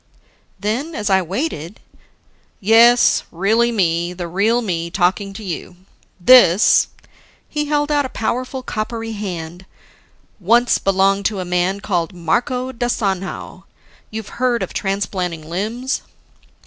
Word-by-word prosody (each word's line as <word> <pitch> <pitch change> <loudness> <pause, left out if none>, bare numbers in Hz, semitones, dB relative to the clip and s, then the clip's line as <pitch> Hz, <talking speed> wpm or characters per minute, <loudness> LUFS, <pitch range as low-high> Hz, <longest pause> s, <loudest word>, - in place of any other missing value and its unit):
Then, 245 - -2
as 210 -1 -2
I 190 0 +4
waited, 185 - -4 0.8
"Yes, 230 +4 +5
really 220 +7 +2
me, 175 -4 0
the 175 -1 -5
real 215 +7 +1
me 170 -5 -2
talking 190 +3 0
to 215 - -9
you. 180 -1 -6 0.4
This," 200 -2 +6 0.6
he 300 0 -2
held 295 0 0
out 290 -2 +2
a - - -19
powerful, 255 +4 -3
coppery 225 0 -4
hand, 180 -4 -6 0.8
"once 235 +6 +3
belonged 195 +1 +2
to 210 -3 0
a 185 - -3
man 180 +3 0
called 175 -3 -1
Marco 250 - -1
da 240 -1 -2
Sanhao... 195 -5 -3 0.4
You've 220 +1 -8
heard 245 -2 +2
of - - -6
transplanting 185 -5 -3
limbs?" 220 - -3
200 Hz, 125 wpm, -19 LUFS, 180-240 Hz, 0.8 s, This